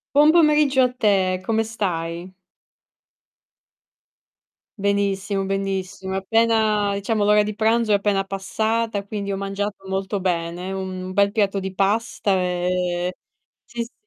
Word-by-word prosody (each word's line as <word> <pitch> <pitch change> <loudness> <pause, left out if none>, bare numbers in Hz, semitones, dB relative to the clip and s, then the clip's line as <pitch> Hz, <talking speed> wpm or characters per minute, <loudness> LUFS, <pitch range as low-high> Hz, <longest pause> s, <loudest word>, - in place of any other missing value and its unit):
Buon 300 +2 +7
pomeriggio 300 -5 +4
a 250 -1 +2
te, 190 -6 +1
come 225 +1 +1
stai? 180 -5 -4 2.4
Benissimo, 200 0 0
benissimo 195 0 -3
appena 215 0 +2
diciamo 205 +1 0
l'ora 210 0 +5
di 210 0 -4
pranzo 225 0 +2
è - - +6
appena 200 -1 0
passata 215 +2 -2
quindi 200 -1 -5
ho 195 - -1
mangiato 195 0 -4
molto 190 +1 -2
bene, 175 0 -2
un 185 -1 -5
bel 200 +1 +3
piatto 200 -3 +1
di 190 0 -5
pasta, 200 +1 0
ehm 180 -1 0 0.5
sì, 240 0 -5
sì. 235 - -16
200 Hz, 125 wpm, -22 LUFS, 190-220 Hz, 2.4 s, Buon